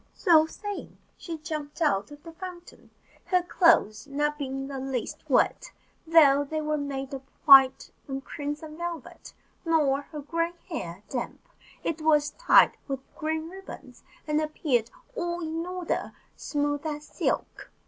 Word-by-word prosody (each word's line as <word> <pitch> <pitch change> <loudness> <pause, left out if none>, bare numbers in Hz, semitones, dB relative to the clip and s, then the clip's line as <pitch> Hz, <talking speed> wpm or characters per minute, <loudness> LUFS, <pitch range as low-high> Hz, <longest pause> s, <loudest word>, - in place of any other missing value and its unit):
So 320 -5 +5
saying, 410 +4 -7 0.2
she 335 -2 -6
jumped 300 -1 -6
out 245 - +1
of 290 0 -13
the 330 - -9
fountain, 355 0 -10 0.4
her 365 -1 +2
clothes 305 - +3
not 295 +1 -1
being 270 -1 -4
the 275 -1 -5
least 260 -2 -4
wet, - - +2 0.4
though 290 -4 +6
they 310 +2 -3
were 305 0 -1
made 275 -1 -4
of 270 - -5 0.2
white 270 -3 +7 0.2
and 270 -1 -5
crimson 300 +2 -6
velvet, 340 -4 -7 0.3
nor 300 -5 +2
her 300 +1 -8
grey 335 +3 -1 0.2
hair 185 - -5
damp: 245 - -5 0.4
it 320 -1 -2
was 300 -1 +3
tied - - +5
with 270 -2 -6
green 315 0 -2
ribbons, 385 +3 -11 0.2
and 300 0 +1
appeared 285 -7 0 0.3
all 345 -3 -2
in 325 0 -3
order 365 -2 -2
and - - -10 0.2
smooth 290 0 -2
as 300 -1 -4
silk. - - -3
300 Hz, 150 wpm, -27 LUFS, 275-330 Hz, 0.4 s, white